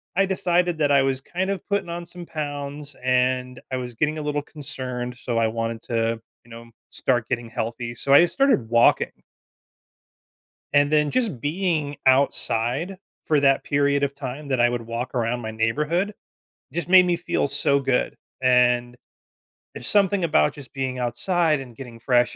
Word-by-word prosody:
I 195 Hz, +1 st, +4 dB
decided 180 Hz, -2 st, +1 dB
that 145 Hz, -2 st, +2 dB
I 140 Hz, -1 st, +5 dB
was 135 Hz, 0 st, 0 dB
kind 185 Hz, +6 st, -3 dB
of 195 Hz, -, -3 dB
putting 200 Hz, -3 st, -1 dB
on 170 Hz, 0 st, -5 dB
some 175 Hz, 0 st, -10 dB
pounds 145 Hz, -1 st, -5 dB
and 125 Hz, 0 st, +1 dB
I 130 Hz, -, -1 dB
was 125 Hz, -2 st, -6 dB
getting 155 Hz, +4 st, 0 dB
a -, -, -3 dB
little 150 Hz, 0 st, -1 dB
concerned, 130 Hz, -5 st, -6 dB
so 120 Hz, -2 st, -2 dB
I 115 Hz, -, +3 dB
wanted 115 Hz, 0 st, -3 dB
to, 115 Hz, -1 st, -1 dB, 0.2 s
you 120 Hz, -, -18 dB
know, 115 Hz, 0 st, -11 dB, 0.2 s
start 120 Hz, -3 st, 0 dB
getting 120 Hz, -2 st, -2 dB
healthy. 120 Hz, 0 st, -4 dB
So, 135 Hz, -, +1 dB
I 140 Hz, -, +9 dB
just 175 Hz, -, +1 dB
started 270 Hz, -, +2 dB
walking. 115 Hz, 0 st, +3 dB, 1.5 s
And 145 Hz, 0 st, +4 dB
then 150 Hz, -1 st, +3 dB
just 225 Hz, -, -1 dB
being 155 Hz, -2 st, -1 dB
outside 130 Hz, +5 st, +1 dB, 0.3 s
for 150 Hz, -2 st, +3 dB
that 135 Hz, -1 st, +3 dB
period 140 Hz, 0 st, +1 dB
of 140 Hz, 0 st, 0 dB
time 140 Hz, +1 st, -6 dB
that 130 Hz, -3 st, 0 dB
I 120 Hz, -, +5 dB
would 120 Hz, -1 st, -2 dB
walk 115 Hz, +3 st, -5 dB
around 120 Hz, 0 st, 0 dB
my 110 Hz, -2 st, -5 dB
neighborhood 150 Hz, -, 0 dB, 0.6 s
just 170 Hz, +1 st, -3 dB
made 185 Hz, 0 st, +8 dB
me 175 Hz, -, +2 dB
feel 170 Hz, -3 st, -1 dB
so 140 Hz, 0 st, +2 dB
good. 130 Hz, -2 st, 0 dB, 0.2 s
And 125 Hz, -1 st, +3 dB, 0.8 s
there's 125 Hz, -, -7 dB
something 200 Hz, -2 st, +2 dB
about 75 Hz, -, +3 dB
just 140 Hz, -2 st, -13 dB
being 130 Hz, -2 st, -3 dB
outside 155 Hz, +6 st, +1 dB
and 125 Hz, -3 st, -10 dB
getting 120 Hz, -2 st, -10 dB
fresh 120 Hz, 0 st, +2 dB
135 Hz, 175 wpm, -23 LUFS, 120-155 Hz, 1.5 s, I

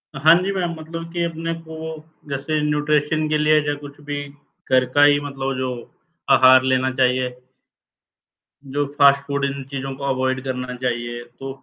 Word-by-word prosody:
हाँ, 155 Hz, +4 st, +6 dB
जी। 195 Hz, -, -1 dB
मेम, 175 Hz, -3 st, -1 dB
मतलब 165 Hz, +1 st, -7 dB
कि 175 Hz, -1 st, -1 dB
अपने 165 Hz, 0 st, -3 dB
को 165 Hz, -1 st, -9 dB, 0.5 s
जैसे 140 Hz, +3 st, -2 dB
न्यूट्रिशन 150 Hz, +1 st, +1 dB
के 155 Hz, -, +2 dB
लिए 155 Hz, 0 st, +4 dB
या 145 Hz, -, +1 dB
कुछ 145 Hz, 0 st, -11 dB
भी 145 Hz, 0 st, -4 dB, 0.5 s
घर 130 Hz, 0 st, +5 dB
का 145 Hz, -, +5 dB
ही 145 Hz, 0 st, +6 dB
मतलब 135 Hz, -2 st, -3 dB
जो, 130 Hz, 0 st, -1 dB, 0.6 s
आहार 130 Hz, 0 st, +7 dB
लेना 130 Hz, 0 st, +1 dB
चाहिए। 130 Hz, -1 st, +1 dB, 1.4 s
जो 145 Hz, +2 st, -1 dB
फास्ट 140 Hz, 0 st, +6 dB
फूड, 140 Hz, -1 st, -1 dB
इन 140 Hz, 0 st, -3 dB
चीज़ों 135 Hz, 0 st, -4 dB
को 140 Hz, -, -10 dB
अवॉइड 130 Hz, -1 st, -1 dB
करना 125 Hz, -1 st, -4 dB
चाहिए। 120 Hz, -1 st, -3 dB, 0.2 s
तो 135 Hz, -, -6 dB
140 Hz, 165 wpm, -21 LUFS, 130-155 Hz, 1.4 s, आहार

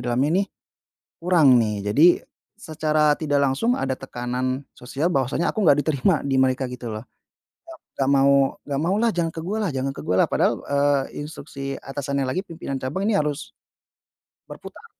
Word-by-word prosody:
dalamnya 140 Hz, +10 st, +1 dB
nih, -, -, -24 dB, 0.8 s
kurang 160 Hz, -8 st, +5 dB
nih. 105 Hz, -2 st, 0 dB, 0.2 s
Jadi 155 Hz, +10 st, +6 dB, 0.5 s
secara 155 Hz, -1 st, +1 dB
tidak 145 Hz, -2 st, 0 dB
langsung 140 Hz, -, +1 dB
ada 130 Hz, -1 st, -1 dB
tekanan 130 Hz, +1 st, -4 dB
sosial 135 Hz, +6 st, -2 dB
bahwasanya 140 Hz, -1 st, 0 dB
aku 215 Hz, -, 0 dB
nggak 145 Hz, -4 st, +5 dB
diterima 155 Hz, +3 st, +1 dB
di 135 Hz, -, 0 dB
mereka 130 Hz, 0 st, +2 dB
gitu 125 Hz, -2 st, -7 dB
loh. 110 Hz, +3 st, -7 dB, 0.6 s
"Nga 330 Hz, -, -10 dB, 0.2 s
nggak 135 Hz, -, +2 dB
mau 140 Hz, 0 st, +4 dB, 0.3 s
nggak 140 Hz, -1 st, -3 dB
mau 170 Hz, +6 st, 0 dB
lah, 230 Hz, +2 st, +2 dB
jangan 170 Hz, -2 st, -1 dB
ke 160 Hz, -, -4 dB
gua 200 Hz, +6 st, -3 dB
lah -, -, -2 dB
jangan 135 Hz, +1 st, -1 dB
ke -, -, -10 dB
gua 90 Hz, -, +1 dB
lah." -, -, 0 dB
Padahal, -, -, +2 dB
eee, 140 Hz, -1 st, +1 dB, 0.2 s
instruksi 140 Hz, -2 st, -7 dB
atasannya 140 Hz, 0 st, -3 dB
lagi 180 Hz, +10 st, -3 dB
pimpinan 160 Hz, -5 st, -5 dB
cabang 145 Hz, +10 st, -3 dB
ini 215 Hz, 0 st, +1 dB
harus 150 Hz, 0 st, -3 dB, 1.0 s
berputar. -, -, -11 dB
140 Hz, 170 wpm, -23 LUFS, 130-160 Hz, 1.0 s, Jadi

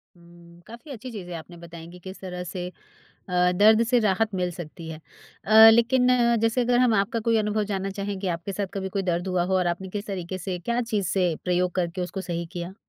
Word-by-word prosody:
ऊँ, 170 Hz, 0 st, -18 dB
काफ़ी 235 Hz, +6 st, -11 dB
अच्छी 255 Hz, 0 st, -8 dB
चीज़ें 180 Hz, -5 st, -7 dB
आपने 170 Hz, +2 st, -10 dB
बताएँ 170 Hz, -1 st, -11 dB
कि 180 Hz, -, -12 dB
किस 190 Hz, +2 st, -10 dB
तरह 180 Hz, -1 st, -6 dB
से 180 Hz, 0 st, -5 dB, 0.6 s
अ, 180 Hz, 0 st, +2 dB
दर्द 215 Hz, +4 st, +5 dB
से 245 Hz, +1 st, +3 dB
राहत 210 Hz, 0 st, +1 dB
मिल 180 Hz, -1 st, -1 dB
सकती 165 Hz, -1 st, -9 dB
है। 155 Hz, -, -8 dB, 0.4 s
अ, 220 Hz, +2 st, +9 dB
लेकिन 245 Hz, +3 st, +3 dB, 0.3 s
जैसे 225 Hz, +2 st, +1 dB
अगर 245 Hz, 0 st, +2 dB
हम 250 Hz, -3 st, +4 dB
आपका 200 Hz, +3 st, 0 dB
कोई 230 Hz, -, +4 dB
अनुभव 210 Hz, 0 st, 0 dB
जानना 195 Hz, 0 st, -2 dB
चाहें 200 Hz, 0 st, -4 dB
कि 195 Hz, -, -5 dB
आपके 180 Hz, +4 st, -7 dB
साथ 200 Hz, +1 st, -2 dB
कभी 190 Hz, -1 st, -3 dB
कोई 195 Hz, +1 st, -2 dB
दर्द 175 Hz, 0 st, -1 dB
हुआ 180 Hz, -1 st, +1 dB
हो 190 Hz, +1 st, -1 dB
और 180 Hz, -, 0 dB
आपने 175 Hz, +2 st, -2 dB
किस 205 Hz, +2 st, -5 dB
तरीके 185 Hz, -2 st, -5 dB
से 185 Hz, -1 st, -4 dB
क्या 235 Hz, +7 st, -1 dB
चीज़ 215 Hz, -5 st, -1 dB
से 180 Hz, -4 st, +1 dB
प्रयोग 180 Hz, 0 st, +1 dB
करके 180 Hz, 0 st, -2 dB
उसको 185 Hz, +2 st, -5 dB
सही 170 Hz, -2 st, -4 dB
किया? 175 Hz, +1 st, -6 dB
190 Hz, 225 wpm, -25 LUFS, 175-215 Hz, 0.6 s, अ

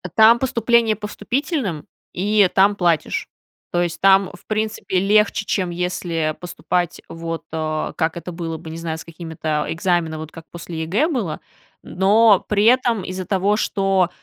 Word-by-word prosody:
Там 225 Hz, +2 st, +7 dB
поступление 235 Hz, -3 st, +2 dB
по 210 Hz, +1 st, -6 dB
вступительным. 225 Hz, -, -3 dB, 0.3 s
И 200 Hz, +1 st, +3 dB
там 200 Hz, +1 st, +4 dB
платишь. 170 Hz, -5 st, 0 dB, 0.4 s
То 175 Hz, -, +1 dB
есть 170 Hz, -1 st, -4 dB
там, 195 Hz, -1 st, +5 dB
в -, -, -15 dB
принципе, 215 Hz, -3 st, -1 dB
легче, 205 Hz, +1 st, +2 dB
чем 185 Hz, -3 st, -1 dB
если 170 Hz, -3 st, -2 dB
поступать 180 Hz, 0 st, -2 dB
вот, 165 Hz, 0 st, -5 dB
а, 155 Hz, -1 st, -2 dB
как 160 Hz, -1 st, -1 dB
это 170 Hz, +1 st, -6 dB
было 165 Hz, -1 st, -5 dB
бы, 160 Hz, -, -10 dB
не 160 Hz, -, -7 dB
знаю, 165 Hz, -1 st, -4 dB
с -, -, -9 dB
какими-то 160 Hz, -2 st, -4 dB
экзаменами 165 Hz, -2 st, 0 dB
вот 155 Hz, 0 st, -8 dB
как 165 Hz, -1 st, -11 dB
после 170 Hz, -1 st, -7 dB
ЕГЭ 205 Hz, -, +1 dB
было. 205 Hz, -, -3 dB, 0.4 s
Но 205 Hz, +2 st, +4 dB
при 205 Hz, -1 st, +2 dB
этом, 235 Hz, -3 st, +3 dB
из-за 185 Hz, 0 st, -5 dB
того, 200 Hz, +1 st, +1 dB
что, 195 Hz, -4 st, +1 dB
185 Hz, 160 wpm, -21 LUFS, 165-210 Hz, 0.4 s, Там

